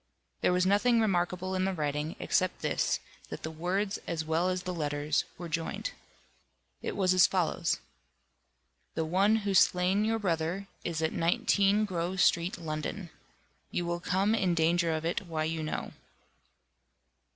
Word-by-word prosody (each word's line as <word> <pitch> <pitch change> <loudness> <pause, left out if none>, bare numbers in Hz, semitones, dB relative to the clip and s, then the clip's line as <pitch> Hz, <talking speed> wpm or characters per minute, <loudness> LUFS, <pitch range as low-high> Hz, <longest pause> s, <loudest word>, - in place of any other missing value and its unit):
There - - +3
was 180 0 +2
nothing 215 +5 +4
remarkable 185 -3 0
in 185 0 0
the 195 - 0
writing, 150 0 -2
except 185 0 0
this, - - +1 0.3
that - - -7
the 160 - -4
words 190 +5 -1
as 160 -2 -2
well 165 +3 +1
as 185 0 -2
the 180 - -3
letters 150 -1 0
were 175 - -6
joined. 165 - -3 0.9
It - - -4
was 185 -2 +3
as 185 0 +6
follows: 180 -4 0 1.2
"The 160 - 0
one 195 +6 +3
who 200 - +1
slain 185 +2 +4
your 225 +1 +1
brother 180 -1 -1 0.2
is 160 -2 -2
at 160 - 0
19 200 +5 +2
Grove 180 -1 -2
Street 170 0 +3
London. 165 +2 -4 0.6
You 175 - -2
will 170 0 -2
come 190 +4 +1
in 185 -6 +2
danger 170 +1 +2
of 160 0 -2
it 175 +3 -2
why 160 -2 -2
you 160 0 -2
know." 155 - -3
175 Hz, 155 wpm, -30 LUFS, 160-190 Hz, 1.2 s, as